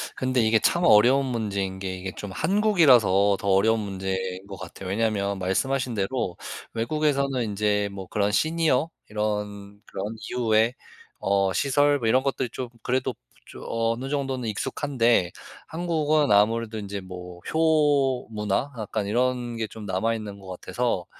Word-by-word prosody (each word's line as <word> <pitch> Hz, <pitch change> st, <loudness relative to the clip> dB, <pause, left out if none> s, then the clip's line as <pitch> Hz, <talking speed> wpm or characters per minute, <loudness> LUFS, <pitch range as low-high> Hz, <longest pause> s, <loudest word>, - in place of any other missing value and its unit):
근데 130 Hz, -1 st, +1 dB
이게 110 Hz, 0 st, +4 dB
참 170 Hz, +10 st, +2 dB
어려운 130 Hz, +1 st, +6 dB
문제인 100 Hz, -6 st, -2 dB
게, 95 Hz, -1 st, -4 dB
이게 95 Hz, +1 st, -5 dB
좀 100 Hz, -, -7 dB
한국이라서 130 Hz, -, +4 dB
더 100 Hz, -, -5 dB
어려운 110 Hz, +4 st, +4 dB
문제인 95 Hz, -2 st, -4 dB
것 100 Hz, -, -7 dB
같아요. 95 Hz, +1 st, -8 dB
왜냐하면 100 Hz, -1 st, 0 dB
말씀하신 125 Hz, +7 st, 0 dB
대로 100 Hz, -2 st, -2 dB, 0.4 s
외국에서는 140 Hz, +2 st, 0 dB
인제 105 Hz, -1 st, 0 dB
뭐 95 Hz, -1 st, -8 dB
그런 105 Hz, -1 st, 0 dB
시니어, 155 Hz, +2 st, +2 dB, 0.2 s
이런 105 Hz, -1 st, -3 dB
그런 105 Hz, +3 st, -5 dB
이후에 115 Hz, -1 st, +2 dB, 0.5 s
어 95 Hz, -1 st, +1 dB
시설 145 Hz, +5 st, +2 dB
뭐 115 Hz, -, -1 dB
이런 130 Hz, +4 st, +3 dB
것들이 135 Hz, -3 st, -1 dB
좀 125 Hz, 0 st, -5 dB
그래도 130 Hz, +1 st, 0 dB, 0.3 s
좀 -, -, -11 dB
어느 115 Hz, +3 st, -1 dB
정도는 135 Hz, -4 st, -2 dB
익숙한데, 120 Hz, -, +1 dB, 0.4 s
한국은 155 Hz, -3 st, +1 dB
아무래도 110 Hz, +2 st, +3 dB
인제 100 Hz, -1 st, -5 dB
뭐 90 Hz, -1 st, -9 dB
효 150 Hz, -5 st, +2 dB
문화, 105 Hz, +5 st, -1 dB
약간 110 Hz, -1 st, -3 dB
이런 120 Hz, +2 st, 0 dB
게 110 Hz, -1 st, -2 dB
좀 105 Hz, 0 st, -10 dB
남아있는 105 Hz, +1 st, -2 dB
것 95 Hz, -, -13 dB
같아서 95 Hz, +1 st, -2 dB
110 Hz, 315 characters per minute, -25 LUFS, 100-130 Hz, 0.5 s, 어려운